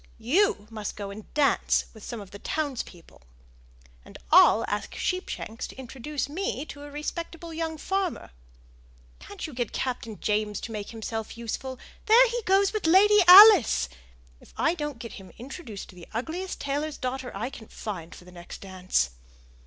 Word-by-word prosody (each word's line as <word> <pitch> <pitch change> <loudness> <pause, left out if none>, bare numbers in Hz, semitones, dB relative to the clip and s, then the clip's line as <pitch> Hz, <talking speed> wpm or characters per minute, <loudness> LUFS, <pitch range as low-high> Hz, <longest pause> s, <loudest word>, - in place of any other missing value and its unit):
You 250 - +2
must 215 -2 -5
go 200 -1 -6
and 210 +1 -11
dance 290 -2 +2
with 220 -2 -14
some 235 - -6
of 195 - -12
the 200 - -10
townspeople, 260 - -5 0.8
and - - -13
I'll 225 - +7
ask 205 0 -3
Sheepshanks 310 - -3
to - - -12
introduce 265 +3 -5
me 305 -2 -3
to 285 - -9
a 290 - -9
respectable 330 +3 -6
young 320 0 -3
farmer. 385 - -2 0.9
Can't 205 - -8
you 310 - -8
get 240 -2 -3
Captain 230 -4 -4
James 210 -1 -1
to 230 - -6
make 210 -2 -5
himself 225 0 -5
useful? 250 +3 -5 0.3
There 475 +3 +7
he 480 +1 -2
goes 390 +2 +4
with 425 -6 -1
Lady 415 +5 +6
Alice! 370 - +9 0.5
If - - -20
I 330 0 +2
don't 295 -6 -4
get 230 0 -8
him 195 -2 -11
introduced 245 - -8
to - - -14
the 175 -2 -12
ugliest 330 +10 -4
tailor's 290 +2 -2
daughter 255 0 -4
I 230 +7 -3
can 220 - -11
find 175 -6 -7
for 180 - -14
the 180 - -14
next 175 -1 -10
dance!" 185 - -1
260 Hz, 170 wpm, -27 LUFS, 210-325 Hz, 0.9 s, Alice